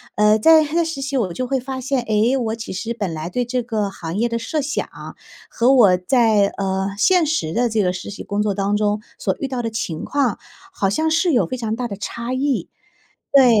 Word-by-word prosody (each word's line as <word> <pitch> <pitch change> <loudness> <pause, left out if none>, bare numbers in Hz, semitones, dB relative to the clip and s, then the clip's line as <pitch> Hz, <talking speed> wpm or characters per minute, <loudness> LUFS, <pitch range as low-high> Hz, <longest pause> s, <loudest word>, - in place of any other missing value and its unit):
呃， 210 +1 +4
在 315 +7 +6
在 330 +3 +1
实 320 -4 -4
习， 275 +1 -3
我 205 -8 0
就 255 +7 -3
会 265 0 0
发 260 +1 -5
现， 260 0 -1
哎， 225 +3 +1
我 225 -3 -1
其 225 -3 -7
实 225 +5 -3
本 200 -7 -3
来 155 +1 -5
对 245 +6 -1
这 250 +1 -2
个 220 -4 -2
行 170 -2 -6
业 235 +3 +2
的 230 0 -2
设 300 +7 -2
想， 285 +2 -2 0.6
和 240 +3 +2
我 210 -8 +6
在， 210 +2 +3
呃， 190 0 -1
现 360 - +4
实 290 - -1
的 240 +3 +1
这 220 -1 +1
个 180 -1 +1
实 185 +2 -7
习 205 - -8
工 205 +1 -1
作 210 -1 0
当 200 +1 0
中 210 0 0 0.2
所 190 - -1
遇 275 - -2
到 255 -2 -3
的 230 - -2
情 180 -8 -4
况， 265 -6 0 0.4
好 195 - 0
像 315 +10 0
是 330 +2 +2
有 245 - +2
非 255 - -3
常 225 -3 -3
大 245 0 -2
的 200 - -6
差 235 +4 -5
异。 260 - 0 0.6
对， 275 -2 +7
230 Hz, 245 characters per minute, -20 LUFS, 205-265 Hz, 0.6 s, 对